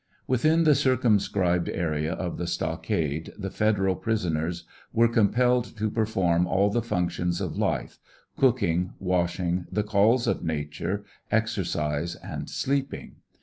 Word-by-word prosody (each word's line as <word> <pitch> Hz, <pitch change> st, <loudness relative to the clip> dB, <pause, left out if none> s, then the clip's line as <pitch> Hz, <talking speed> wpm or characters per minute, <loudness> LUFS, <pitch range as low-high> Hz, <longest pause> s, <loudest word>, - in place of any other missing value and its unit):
Within 155 Hz, +7 st, +3 dB
the 155 Hz, -2 st, +6 dB
circumscribed 105 Hz, -9 st, +2 dB
area 80 Hz, -2 st, -1 dB
of 90 Hz, -2 st, -4 dB
the 90 Hz, -, -2 dB
stockade 80 Hz, -2 st, -2 dB
the 95 Hz, -2 st, -5 dB
Federal 95 Hz, -3 st, +1 dB
prison 95 Hz, -6 st, -1 dB
ers 85 Hz, +2 st, -3 dB, 0.3 s
were 115 Hz, +1 st, +4 dB
compelled 120 Hz, +2 st, +2 dB
to 105 Hz, 0 st, -1 dB
perform 95 Hz, -6 st, +1 dB
all 100 Hz, +3 st, +2 dB
the 120 Hz, -, +1 dB
functions 90 Hz, -4 st, -1 dB
of 90 Hz, -5 st, -3 dB
life, -, -, -1 dB, 0.4 s
cooking, 100 Hz, -9 st, +2 dB
wash 90 Hz, -1 st, 0 dB
ing, 90 Hz, 0 st, -1 dB
the 105 Hz, -, 0 dB
calls 110 Hz, +4 st, +3 dB
of -, -, 0 dB
nature, 80 Hz, +6 st, -3 dB, 0.3 s
exercise, 85 Hz, -8 st, -1 dB
and -, -, -7 dB
sleeping. 140 Hz, 0 st, -2 dB
95 Hz, 135 wpm, -26 LUFS, 85-115 Hz, 0.4 s, the